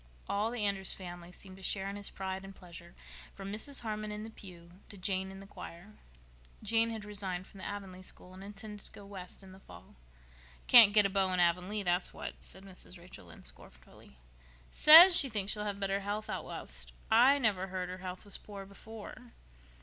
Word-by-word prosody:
All 205 +2 0
the 230 -3 -2
Andrews 195 -1 -1
family 175 -1 -9
seemed 190 +1 -9
to - - -14
share 195 +1 0
in 200 - -5
his 205 0 -1
pride 190 0 -5
and 195 0 -10
pleasure, 170 -1 -13 0.4
from 195 0 -7
Mrs. 265 +6 -1
Harmon 215 -2 -4
in 210 0 -5
the 225 - -8
pew 175 -5 -13 0.2
to 205 - -8
Jane 190 0 -1
in 195 0 -10
the 195 - -11
choir. 195 +1 -11 0.7
Jane 225 +2 +2
had 220 -2 -6
resigned 190 -3 -4
from 195 - -15
the - - -6
Avonlea 195 -2 -7
school 185 0 -7
and 190 +1 -11
intended 205 +1 -9
to - - -12
go 205 - -12
West 195 -1 -10
in 190 - -13
the 190 - -14
fall. - - -15 0.7
"Can't 230 -4 +9
get 210 -1 +5
a - - +2
beau 190 -1 +1
in 180 - 0
Avonlea, 180 +4 +1
that's 180 0 0
what," - - -6
said 190 - -3
Mrs. 185 -1 -5
Rachel 170 - -12
Lynde 85 - -14
scornfully. 65 +1 -11 0.5
"Says 340 +4 +10
she 285 -7 +5
thinks 210 -3 -1
she'll 210 0 -3
have 200 -1 -3
better 195 0 0
health 205 +2 -4
out - - -4
West. - - -6 0.2
I 250 +5 +6
never 205 -8 +1
heard 185 -1 -4
her 185 +1 -7
health 185 +2 -7
was 205 - -2
poor 200 -2 -9
before." 220 +4 -11
195 Hz, 205 wpm, -32 LUFS, 185-210 Hz, 0.7 s, Says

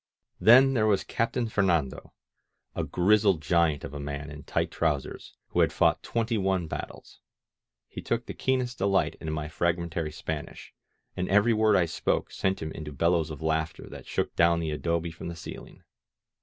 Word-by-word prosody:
Then 130 +7 +7
there 110 -4 +2
was 100 -3 +2
Captain 115 +1 -1
Fernando, 85 -10 0 0.6
a - - -2
grizzled 100 -1 +3
giant 80 -2 +2
of 70 - -7
a 75 - -6
man 70 +1 -5
in 75 0 -9
tight - - -2
trousers, 75 -5 -2
who - - -1
had - - +4
fought - - +2
twenty 115 -1 -1
one 95 -2 0
battles. 80 - -8 0.7
He - - -8
took - - -2
the - - -6
keenest 130 -2 -1
delight 100 0 +1
in 80 - -4
my 75 -1 -3
frag 85 +2 0
mentary 85 -2 -4
Spanish, 75 0 -6 0.4
and 90 - -2
every 105 +4 +4
word 110 -1 +3
I 90 - +4
spoke 80 - -1
sent 95 -3 -1
him 80 - -4
into 75 -1 -7
bellows 85 +3 +1
of 75 0 -8
laughter 80 0 -2
that - - -11
shook - - -2
down 85 0 +4
the 80 -2 -2
adobe 85 +2 -1
from 80 - -8
the 85 - -5
ceiling. 80 - -10
85 Hz, 180 wpm, -27 LUFS, 80-100 Hz, 0.7 s, Then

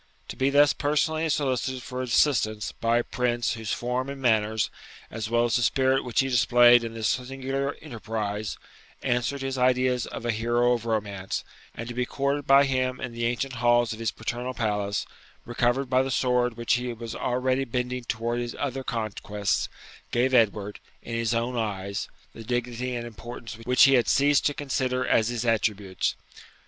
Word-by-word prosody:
To - - -5
be 135 +1 +1
thus 145 +1 +5
personally 155 +2 0
solicited 130 -3 -1
for 130 0 -5
assistance 115 -4 +1
by 115 +1 +1
a 120 - +1
prince 120 -1 -1
whose 110 -2 -5
form 125 +2 -2
and 140 0 -6
manners, 110 -3 +1 0.4
as 110 -1 -4
well 120 0 +3
as 120 +1 +2
the - - -1
spirit 130 +3 +2
which 125 0 +1
he 135 - -1
displayed 120 -1 +6
in 115 0 -5
this 110 -2 -1
singular 135 +2 -2
enterprise, 110 -6 -4 0.5
answered 125 +3 0
his 135 -1 -3
ideas 125 -1 +2
of - - -7
a 120 - +2
hero 120 +2 +2
of 115 -1 -3
romance; 100 -4 -2 0.3
to 115 +1 -5
be 125 0 -1
courted 140 +1 -1
by 140 +1 +7
him 130 -1 0
in 125 - -4
the 115 0 -3
ancient 125 +3 -2
halls 120 -1 +3
of 110 - -9
his 115 - 0
paternal 120 +2 -4
palace, 105 -3 -1 0.4
recovered 120 +3 0
by 130 +1 +3
the 135 - -2
sword 125 -2 +1
which 120 -1 +1
he 125 0 0
was 115 0 -7
already 130 +1 0
bending 125 0 -3
towards 120 +1 -2
other 135 -1 -3
conquests, 105 -5 -2 0.4
gave 130 +2 +1
Edward, 105 -4 +2 0.2
in 115 - -7
his 115 0 0
own 120 +2 -1
eyes, 100 -3 -3 0.2
the 115 - -9
dignity 120 +1 -2
and 120 -1 -4
importance 115 +1 -8
which 125 0 +5
he 135 - +7
had 125 -3 +4
ceased 145 +1 +4
to 145 - -2
consider 130 -2 -1
as 110 -3 +3
his 120 0 -2
attributes. 105 -4 0
120 Hz, 175 wpm, -26 LUFS, 115-130 Hz, 0.5 s, by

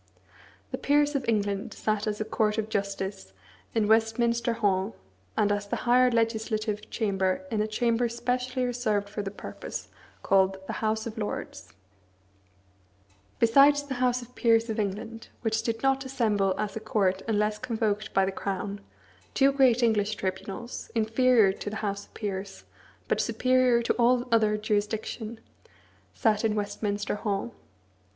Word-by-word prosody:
The - - -3
peers 290 +1 +3
of 275 -3 -1
England 205 -2 -1
sat 215 0 -1
as 210 0 -2
a 215 - -1
court 215 0 0
of 220 0 -2
justice 195 - -3 0.4
in 220 -2 +2
Westminster 230 +2 +2
Hall, 195 - 0 0.4
and 205 -1 +3
as 205 0 -1
the - - -1
higher 250 +1 +5
legislative 220 -2 -1
chamber 195 +2 0
in 215 -2 +1
a 215 - 0
chamber 235 +2 +1
specially 250 +2 -1
reserved 225 -5 0
for 210 0 -4
the 200 - -4
purpose, 200 - -7 0.3
called 190 0 +3
The - - -4
House 220 0 0
of 225 -1 -6
Lords. 90 - -5 1.6
Besides 280 +5 +5
the 285 -2 -5
house 250 -1 +2
of 245 +1 -16
peers 230 -1 +3
of 220 - -3
England, 220 +3 -4
which 225 -1 0
did 230 0 -3
not 270 0 +2
assemble 215 -8 +1
as 205 -2 -3
a - - -2
court 195 -3 0
unless 210 -1 +1
convoked 220 -3 -1
by 195 - +3
the 190 - -1
crown, 200 +1 -4 0.5
two 275 0 +5
great 255 -3 +4
English 215 -2 +2
tribunals, 195 +5 -5
inferior 225 -2 +4
to 205 - -6
the 210 - -6
house 200 0 -3
of - - -32
peers, 195 -2 -5 0.4
but - - +1
superior 255 -2 +3
to - - +1
all 245 +1 +3
other 215 -2 +3
jurisdiction, 215 +2 -2 0.8
sat 215 -3 +2
in 220 -1 +1
Westminster 205 0 -2
Hall. 205 +2 -2
220 Hz, 150 wpm, -27 LUFS, 205-235 Hz, 1.6 s, higher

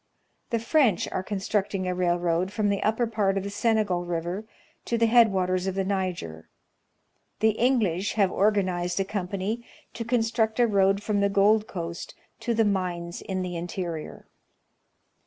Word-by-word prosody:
The 235 - +1
French 230 - +2
are - - -1
constructing 195 -1 -2
a 180 - 0
railroad 175 0 0
from 205 0 0
the 200 -1 0
upper 225 +3 +1
part 210 -4 0
of 195 - -1
the 200 - -5
Senegal 205 -4 +1
River 175 +4 -3 0.4
to 235 - 0
the 230 - +3
head 230 -1 +6
waters 185 0 0
of 190 - -2
the 195 - 0
Niger. 180 - -3 0.9
The 220 +1 +4
English 210 -6 +1
have 200 -4 +2
organized 185 -3 +1
a 195 - +1
company 200 +3 -3 0.3
to 230 - -4
construct 225 -1 0
a 240 - +6
road 200 -2 +2
from 210 -1 0
the 200 0 +2
Gold 210 +2 +3
Coast 170 -2 -6 0.2
to 235 - -1
the 225 0 +3
mines 180 -3 -2
in 185 -1 -3
the 180 -1 -4
interior. 170 -2 -5
195 Hz, 160 wpm, -26 LUFS, 180-220 Hz, 0.9 s, head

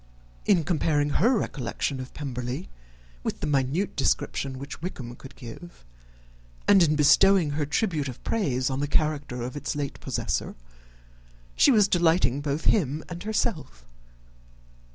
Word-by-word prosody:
In 175 -5 +4
comparing 150 -3 +1
her 230 - +3
recollection 130 - -3
of 130 0 -7
Pemberley 125 - -4 0.5
with - - -3
the - - -3
minute 145 +6 0
description 135 -1 0
which 140 +1 -8
Wickham 125 -9 -6
could 135 - -13
give, 125 - -11 0.8
and 200 -2 +7
in 155 -3 +4
bestowing 155 +3 +5
her 145 0 -1
tribute 150 -2 0
of 125 - -8
praise 135 - 0
on 130 - -2
the 145 - -1
character 145 -5 0
of 125 +3 -5
its 145 - -3
late 145 -2 -4
possessor, - - -2 1.0
she - - +5
was 215 -6 +5
delighting 165 -6 +2
both 145 +2 -2
him 155 -6 +2
and 175 0 -6
herself. 205 - -2
145 Hz, 140 wpm, -26 LUFS, 130-175 Hz, 1.0 s, and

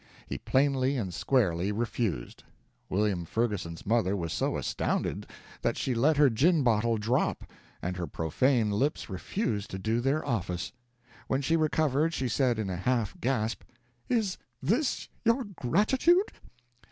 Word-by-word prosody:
He - - -5
plainly 135 0 +2
and 95 -7 -3
squarely 95 -6 +1
refused. 105 - -2 0.5
William 100 -2 +1
Ferguson's 100 -4 -2
mother 100 -3 +2
was 85 -3 -3
so - - 0
astounded - - -2 0.3
that - - 0
she 130 - -1
let 140 +6 +3
her 145 -1 +7
gin 145 +7 +3
bottle 115 -1 +2
drop, 115 +4 0 0.4
and 90 +1 -2
her 85 -2 -3
profane 110 - +1
lips 130 +2 -1
refused 105 - -2
to 95 - -5
do 110 +4 0
their 140 +5 0
office. 90 -9 -2 0.6
When 135 +1 0
she 160 +5 +2
recovered 155 0 +1
she 130 - -1
said 125 0 +2
in 110 -2 -2
a 90 - -3
half 115 +2 0
gasp, 115 -3 0 0.5
"Is 220 -6 0 0.2
this 225 - 0 0.2
your 230 +3 +3
gratitude? 260 - +3
120 Hz, 140 wpm, -29 LUFS, 100-145 Hz, 0.6 s, her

